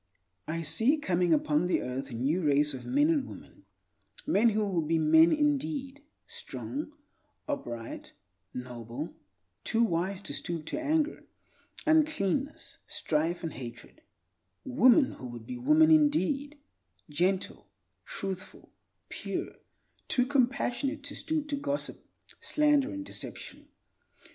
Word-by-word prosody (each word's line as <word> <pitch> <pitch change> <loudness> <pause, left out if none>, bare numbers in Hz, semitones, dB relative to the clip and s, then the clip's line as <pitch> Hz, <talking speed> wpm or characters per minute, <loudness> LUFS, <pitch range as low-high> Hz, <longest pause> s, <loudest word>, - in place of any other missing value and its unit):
I 165 +1 -2
see 220 - +3
coming 180 - +1
upon 155 +2 +3
the 180 - +1
earth 130 +2 -4
a - - -8
new 140 +10 +1
race 145 -1 +3
of 130 - -7
men 285 +4 +3
and 290 -5 +1
women—men 235 -6 -3
who 215 0 +1
will 180 -4 +1
be 160 +1 +1
men 160 +1 +6
indeed, 290 -1 0 0.2
strong, 300 +2 -6 0.5
upright, 120 - -5 0.4
noble; 125 +3 -6 0.5
too 230 0 +2
wise 185 -1 0
to - - -4
stoop 165 +1 -3
to - - -3
anger, 310 +1 0 0.6
uncleanness, 300 - +1
strife, 165 +3 -1
and 165 - -3
hatred—women 255 - 0
who 130 - -6
would 120 -2 -9
be 250 - -6
women 305 +5 +5
indeed, 295 -1 +3 0.5
gentle, 185 +6 -1 0.4
truthful, 190 -1 -6 0.4
pure; - - -4 0.5
too 250 - +2
compassionate 275 +1 0
to 285 0 -5
stoop 310 -2 -2
to 285 - 0
gossip, 285 0 -3 0.4
slander, 295 -2 +3
and 295 -1 -5
deception. - - -8
230 Hz, 120 wpm, -30 LUFS, -, 0.6 s, men